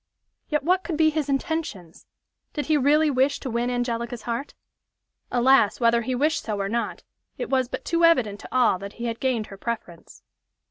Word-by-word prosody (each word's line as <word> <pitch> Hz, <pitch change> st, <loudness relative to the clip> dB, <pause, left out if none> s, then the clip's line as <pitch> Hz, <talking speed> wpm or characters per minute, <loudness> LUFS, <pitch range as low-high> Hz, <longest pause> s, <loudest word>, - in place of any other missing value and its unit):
Yet, 300 Hz, -2 st, 0 dB
what 365 Hz, +4 st, +2 dB
could 325 Hz, -, -3 dB
be 315 Hz, 0 st, +4 dB
his 300 Hz, -2 st, -2 dB
intentions? 270 Hz, -, -3 dB, 0.5 s
Did 295 Hz, -, -3 dB
he 310 Hz, -, +2 dB
really 295 Hz, +2 st, +3 dB
wish 265 Hz, +2 st, +2 dB
to 260 Hz, -, -4 dB
win 235 Hz, +2 st, 0 dB
Angelica's 240 Hz, -1 st, -2 dB
heart? 240 Hz, +4 st, -4 dB, 0.8 s
Alas! 245 Hz, -3 st, +4 dB
whether 235 Hz, -1 st, +3 dB
he 255 Hz, +2 st, -2 dB
wished 305 Hz, +5 st, +1 dB
so 210 Hz, -3 st, -3 dB
or 195 Hz, -, -1 dB
not, 235 Hz, +3 st, -3 dB, 0.3 s
it -, -, -5 dB
was 260 Hz, -2 st, +2 dB
but -, -, -6 dB
too 335 Hz, -1 st, +1 dB
evident 250 Hz, -12 st, +4 dB
to -, -, -11 dB
all 250 Hz, -7 st, +3 dB
that 200 Hz, +1 st, -8 dB
he 235 Hz, -, -6 dB
had 230 Hz, -1 st, -3 dB
gained 250 Hz, -5 st, 0 dB
her -, -, -10 dB
preference. 215 Hz, -6 st, -6 dB
250 Hz, 190 wpm, -24 LUFS, 230-295 Hz, 0.8 s, be